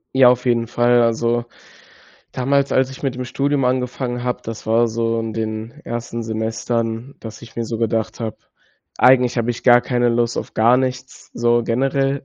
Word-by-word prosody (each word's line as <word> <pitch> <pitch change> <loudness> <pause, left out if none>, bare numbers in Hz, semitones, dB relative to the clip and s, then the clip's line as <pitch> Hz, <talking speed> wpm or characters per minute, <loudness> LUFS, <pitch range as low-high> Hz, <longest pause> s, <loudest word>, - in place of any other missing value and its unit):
Ja, 130 -2 +7
auf 125 0 +1
jeden 120 -2 +1
Fall. 120 +1 +3
Also 115 +1 +1 0.9
damals, 140 +2 0
als 130 0 +2
ich 135 - -11
mit 135 -3 -2
dem 125 - -4
Studium 140 +2 0
angefangen 125 -1 -1
habe, 125 0 -2
das 115 -1 -7
war 115 +1 +3
so 115 0 -1
in 115 -1 -3
den 110 +1 -4
ersten 120 0 -4
Semestern, 115 +2 -3
dass 110 0 -10
ich 115 - -13
mir 115 - -2
so 115 0 -4
gedacht 115 0 -2
habe, 110 -2 -4 0.6
eigentlich 125 -1 +4
habe 120 0 0
ich 120 - -6
gar 120 -1 +7
keine 120 -1 0
Lust 120 0 0
auf - - -6
gar 115 +3 +4
nichts, 130 0 -4
so 120 0 +2
generell, 135 +3 0
120 Hz, 180 wpm, -20 LUFS, 115-125 Hz, 0.9 s, Ja